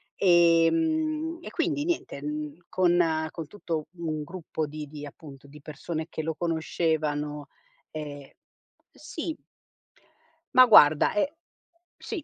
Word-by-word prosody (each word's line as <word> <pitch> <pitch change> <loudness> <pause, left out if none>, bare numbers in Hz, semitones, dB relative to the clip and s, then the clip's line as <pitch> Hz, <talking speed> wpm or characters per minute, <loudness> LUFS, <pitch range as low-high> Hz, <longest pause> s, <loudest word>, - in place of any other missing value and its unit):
Ehm, 310 - +3
e - - -8
quindi 310 -3 -1
niente, 335 - -3
mhmm, 150 0 -4
con 170 -3 +2
con 165 -3 -7
tutto 165 -5 -4
un 155 -3 -3
gruppo 160 -1 -5
di 150 0 -7
di 150 0 -8
appunto, 140 -1 -12
di 150 +2 -13
persone 155 +2 -5
che - - -4
lo 160 +1 -2
conoscevano, 155 -3 -1 0.4
ehm, 145 -3 -7 0.6
sì 320 -1 -6 1.2
Ma 255 0 +9
guarda, 155 -10 +7
e 280 +8 0 0.6
sì. 350 -8 -6
160 Hz, 120 wpm, -27 LUFS, 150-205 Hz, 1.2 s, Ma